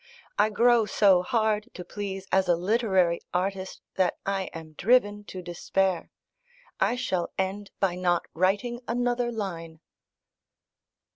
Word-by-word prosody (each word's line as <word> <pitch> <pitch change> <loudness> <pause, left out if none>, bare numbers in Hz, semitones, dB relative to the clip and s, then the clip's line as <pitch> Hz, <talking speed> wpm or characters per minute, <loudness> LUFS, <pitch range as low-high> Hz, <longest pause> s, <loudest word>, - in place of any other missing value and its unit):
I 210 +1 +5
grow 230 0 +4
so 190 -3 +5
hard 215 -2 0
to 180 - -7
please 195 0 -5
as 190 -1 +3
a 175 - +4
literary 190 -2 +2
artist, 190 +1 -2
that 185 -2 +2
I 195 -1 -1
am 160 -1 -9
driven 205 +2 +2
to 185 -2 -8
despair. 180 +1 -1 0.7
I - - +2
shall 190 -9 -1
end 195 +2 -2
by 195 -3 +2
not 175 -1 +1
writing 205 +8 0
another 245 +1 0
line." 165 -7 -5
195 Hz, 130 wpm, -27 LUFS, 180-215 Hz, 0.7 s, I